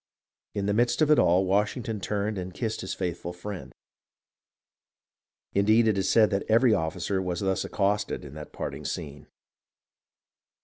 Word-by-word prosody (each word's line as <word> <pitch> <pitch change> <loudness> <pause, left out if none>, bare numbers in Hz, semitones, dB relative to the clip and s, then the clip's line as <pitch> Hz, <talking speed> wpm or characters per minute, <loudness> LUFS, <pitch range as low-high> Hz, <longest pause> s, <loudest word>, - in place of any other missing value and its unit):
In 100 - -1
the 100 - +1
midst 120 +6 +2
of 155 - +3
it 150 - +6
all, 90 +3 +4
Washington 105 +3 0
turned 105 +1 -2
and 90 -1 -6
kissed 110 -2 -3
his 95 - -4
faithful 85 -1 -4
friend. 90 -6 -7 1.8
Indeed, 110 +3 +4
it 110 - +3
is 95 -1 0
said 110 -2 +5
that 100 0 +1
every 115 +1 +5
officer 90 +2 -1
was 90 -2 -3
thus 95 -1 0
accosted 100 -4 -1
in 70 - -10
that 75 0 -9
parting - - -5
scene. 75 0 -6
100 Hz, 150 wpm, -27 LUFS, 90-110 Hz, 1.8 s, it